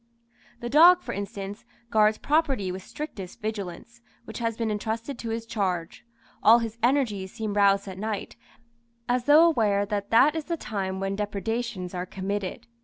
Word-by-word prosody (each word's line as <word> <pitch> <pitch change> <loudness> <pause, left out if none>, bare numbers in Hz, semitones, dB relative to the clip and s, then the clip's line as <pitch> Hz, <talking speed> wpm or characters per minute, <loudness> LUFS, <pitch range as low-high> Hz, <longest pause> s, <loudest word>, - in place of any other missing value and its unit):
The 240 - -3
dog, 345 +6 +7
for - - -5
instance, 200 +1 -6 0.3
guards 215 0 +4
property 275 - +1
with 185 +1 -6
strictest 195 - -8
vigilance, 215 +2 -6 0.2
which - - -7
has 230 -1 -2
been 225 -2 -1
entrusted 225 +5 -3
to 230 - -5
his 225 0 -3
charge; 190 -4 -3 0.3
all 225 +2 +7
his 230 -1 -4
energies 230 -7 +1
seem 220 -3 -3
roused 200 0 +3
at 190 -1 -7
night, 215 -1 -4 0.7
as 245 0 0
though 300 +3 +7
aware 210 -11 +2
that 205 0 -3
that 270 +7 +5
is 320 -2 -3
the 340 -1 -2
time 190 -7 -3
when 195 0 -2
depredations 210 -1 -3
are 180 0 -4
committed. 200 +4 -4
215 Hz, 165 wpm, -26 LUFS, 195-235 Hz, 0.7 s, dog